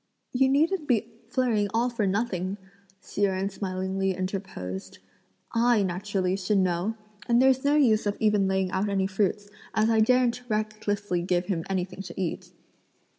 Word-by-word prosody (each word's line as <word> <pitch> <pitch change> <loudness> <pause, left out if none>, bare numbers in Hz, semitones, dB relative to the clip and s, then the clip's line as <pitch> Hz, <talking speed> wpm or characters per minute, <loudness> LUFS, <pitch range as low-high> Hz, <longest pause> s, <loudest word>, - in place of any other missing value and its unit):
"You 265 +1 +3
needn't 310 +4 +2
be 235 -3 +1 0.2
flurrying 240 -5 +1
all 240 +2 +2
for 225 -4 0
nothing," 190 -2 -1 0.5
Hsi - - -6
Jen 195 0 +1
smilingly 190 0 -2
interposed; 185 - -5 0.6
"I, 235 -2 +3
naturally, 190 0 -1
should 200 +2 +1
know; 185 +3 +1 0.3
and 235 -1 +4
there's 265 0 +4
no 285 +1 +3
use 225 -8 +3
of 205 - -1
even 210 -3 +3
laying 190 -1 0
out 190 +3 0
any 195 -1 +1
fruits, 205 +1 -1 0.3
as 215 +1 +3
I 225 - +3
daren't 250 +2 +3
recklessly 215 -3 -1
give 180 0 0
him 175 -4 -2
anything 190 0 -2
to 195 - -8
eat." 180 -4 -3
205 Hz, 155 wpm, -27 LUFS, 190-230 Hz, 0.6 s, and